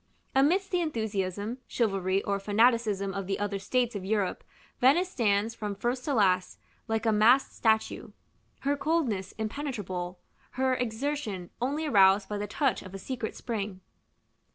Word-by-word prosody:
Amidst 340 +9 +3
the 360 -1 +2
enthusiasm, 220 - -2
chivalry, 195 -4 0
or 200 0 -1
fanaticism 210 -1 +2
of 195 -1 -4
the 195 - -1
other 205 -1 -2
states 245 +3 0
of 200 - -4
Europe, 200 -1 -1 0.4
Venice 315 +9 +4
stands, 215 - +1
from 210 -2 -4
first 240 +5 -2
to 285 - 0
last, 185 -4 +2 0.3
like 225 0 -1
a 225 - +4
masked 230 +6 +4
statue; 220 -1 +1 0.5
her 285 +1 +1
coldness 280 - -1
impenetrable, 210 -7 -4 0.4
her 260 0 +2
exertion 245 -5 -3
only 290 +5 -1
aroused 195 -6 +5
by 210 -1 -3
the 210 - -3
touch 270 +5 0
of 185 0 -10
a - - -3
secret 230 +2 -5
spring. 205 -5 -4
220 Hz, 150 wpm, -29 LUFS, 195-260 Hz, 0.5 s, aroused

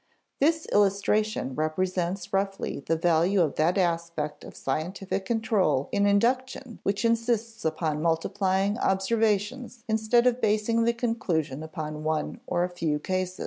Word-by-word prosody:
This 315 +3 +2
illustration 205 -4 +1
represents 180 +5 -2
roughly 195 -4 -1
the 165 +4 -1
value 170 +4 +2
of 160 -5 +2
that 165 +5 +2
aspect 170 -4 -1
of - - -11
scientific 185 +7 -3
control 215 - +1
in 200 0 +2
induction 245 +3 0
which 200 +3 -1
insists 230 -1 0
upon 155 -1 -1
multiplying 190 +5 0
observations 220 +4 0
instead 220 +2 +2
of 250 0 +2
basing 215 +2 +2
the 235 - +3
conclusion 185 - -1
upon 155 -1 -6
one 155 0 -2
or 175 - +1
a 180 - -1
few 165 -4 -1
cases. 185 +3 -3
195 Hz, 135 wpm, -27 LUFS, 165-225 Hz, -, the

